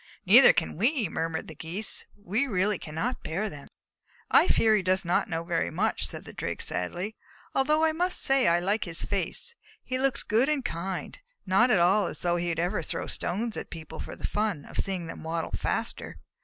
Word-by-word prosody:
"Neither 235 +7 +9
can 160 - -2
we," 235 - +2
murmured 165 0 -2
the 160 - -8
Geese. 170 +8 -1
"We 210 +7 -1
really 200 -3 +1
cannot 165 +12 -3
bear 195 +7 -2
them." 145 -1 -10 0.6
"I - - +6
fear 220 -1 +4
he 210 - +2
does 185 0 +1
not 170 - +1
know 165 0 -2
very 170 - -1
much," - - 0
said - - -7
the - - -10
Drake, - - -4
sadly, 175 - -3 0.4
"although 305 +4 +3
I 320 - +4
must 355 +3 0
say 270 -1 +3
that 170 - +5
I - - +2
like 200 +4 0
his 170 -2 0
face. 200 - -2 0.3
He 255 0 -3
looks 270 0 +1
good 235 +7 +2
and 285 -4 0
kind, 185 -1 -4 0.2
not 195 +6 +4
at 215 - +4
all 180 +3 +4
as - - -7
though 175 0 +1
he 175 0 -1
would 165 - -2
ever 175 +2 0
throw - - -4
stones 220 +5 -2
at - - -6
people 160 -2 -9
for - - -6
the - - -5
fun 210 -8 -1
of - - -6
seeing 190 -3 -2
them 165 - -8
waddle 165 +1 -3
faster. - - -3
190 Hz, 210 wpm, -28 LUFS, 170-235 Hz, 0.6 s, Neither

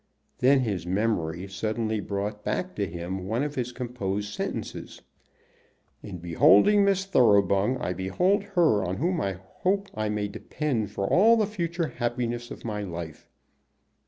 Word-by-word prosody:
Then 135 +1 +5
his 100 -8 -2
memory 95 -3 -1
suddenly 110 +3 -2
brought 105 +1 -4
back 185 0 -2
to 100 -2 0
him 90 +2 -5
one 115 +6 0
of 145 -1 -3
his 125 -3 -3
composed 105 -5 -4
sentences. - - -5 1.0
"In 95 -3 -7
beholding 100 - +5
Miss 195 -1 +2
Thoroughbung 105 - +3
I 90 -6 -2
behold 95 - +1 0.2
her 155 - +4
on 90 +1 -2
whom 175 +3 0
I 100 - -1
hope 185 - -2
I 110 -1 -2
may 105 -1 -1
depend 115 +1 -3
for 100 -2 -3
all 225 - +5
the 215 - +3
future 170 -5 -2
happiness 120 0 -3
of - - -9
my 105 -2 -3
life." 85 -5 -7
110 Hz, 150 wpm, -26 LUFS, 95-145 Hz, 1.0 s, Then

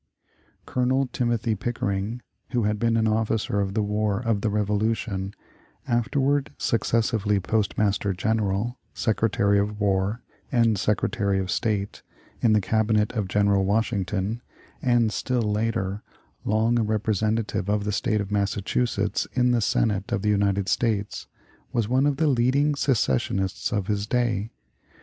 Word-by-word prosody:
Colonel 130 +2 +1
Timothy 120 -2 0
Pickering, 105 +1 -3 0.3
who 120 -2 +2
had 105 0 0
been 115 0 +2
an 110 0 +2
officer 110 -1 0
of 100 0 -2
the 110 - +2
war 105 -1 0
of 115 -4 0
the 110 - +1
Revolution, 105 -1 -1 0.6
afterward 135 +4 +1
successively 110 -3 +1
Postmaster 105 0 0
General, 110 +3 -1 0.2
Secretary 105 -2 +2
of 105 +1 -2
War, 100 +2 0 0.3
and 115 -3 +3
Secretary 100 -1 0
of 95 -1 -2
State, 105 -3 -1 0.4
in 115 -2 +4
the 105 - +4
Cabinet 110 +1 +1
of 105 -5 -1
General 100 0 +2
Washington, 105 +1 -1 0.4
and, 120 -3 +2
still 125 -2 0
later, 105 -2 -1 0.4
long 110 +3 +2
a - - +2
representative 110 -1 0
of 105 0 +1
the 105 - -1
State 105 +1 0
of 100 0 -6
Massachusetts 100 +2 0
in 125 -1 +3
the 120 -1 +2
Senate 105 -2 0
of - - -1
the 105 - +2
United 100 -1 +1
States, 105 -3 -1 0.4
was 115 -4 0
one 130 +4 +3
of 145 -2 0
the 160 - +2
leading 140 +2 +3
secessionists 95 - 0
of 100 -3 -1
his 105 0 -1
day. 115 -3 0
105 Hz, 140 wpm, -25 LUFS, 100-115 Hz, 0.6 s, in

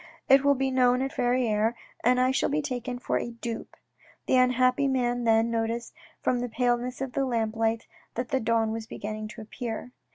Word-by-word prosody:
It 270 -1 +6
will 285 0 +4
be 265 0 0
known 250 0 +3
at 270 - -3
Verrieres, 240 -2 +1 0.3
and 250 +2 +4
I 255 +1 +3
shall 265 - +1
be 300 +1 0
taken 250 -3 -3
for 245 - -1
a - - -4
dupe." 230 -1 -6 0.5
The - - +2
unhappy 255 +2 +3
man 245 -2 0
then 225 0 +3
noticed 230 +1 -2 0.3
from 250 - +2
the 245 0 -3
paleness 245 +2 0
of 265 -2 -3
the 275 - +1
lamplight 225 -2 0 0.3
that 245 0 -3
the 265 - +1
dawn 225 -1 +1
was 220 0 -5
beginning 215 0 -5
to 215 +1 -10
appear. 225 +2 -6
245 Hz, 190 wpm, -27 LUFS, 225-255 Hz, 0.5 s, It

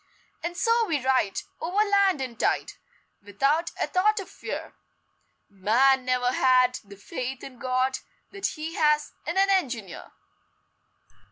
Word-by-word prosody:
And 345 +1 -4
so 460 +4 +3
we 290 -7 -1
ride 255 -7 +1 0.2
Over 385 +6 +1
land 395 -6 +3
and 245 -3 -6
tide, - - 0 0.5
Without 275 - 0
a - - +1
thought 420 +4 +2
of 390 - -8
fear - - -6 0.7
Man 245 +7 +3
never 250 -1 +1
had 255 -1 +3
The 200 -1 -13
faith 255 +5 -6
in 255 -3 -10
God 255 +1 0 0.3
That 395 0 -2
he 315 +2 -5
has 300 -1 +2 0.2
in 340 +3 -2
an 390 0 +4
engineer! 245 - -2
265 Hz, 140 wpm, -26 LUFS, 250-355 Hz, 0.7 s, an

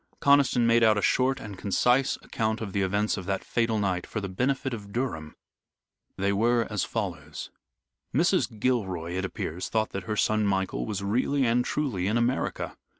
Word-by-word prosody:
Conniston 140 -4 +4
made 115 0 +4
out 110 -2 +5
a - - +1
short 130 +1 +2
and 100 -6 -8
concise 125 +6 +2
account 110 0 -1
of 105 -4 -5
the 100 - +1
events 100 +3 +1
of 95 -2 -6
that 100 -1 -1
fatal 115 -2 0
night, 95 -4 -1
for 110 - -3
the 100 - -4
benefit 130 +7 -1
of 100 -3 -7
Durham. 100 -11 -3 0.8
They 100 +1 +1
were 115 +3 +2
as 105 -3 0
follows: - - -5 0.6
Mrs. 160 - +1
Gilroy, 95 -9 0
it 95 +2 -2
appears, 90 -1 -4
thought 110 -1 0
that 95 -2 -5
her 105 +1 -2
son, 110 -1 +2
Michael, 95 -1 -1
was 100 -2 -3
really 130 +6 +1
and 120 +1 +3
truly 125 -11 -1
in 110 +3 +1
America. 120 +3 -1
110 Hz, 180 wpm, -27 LUFS, 100-125 Hz, 0.8 s, out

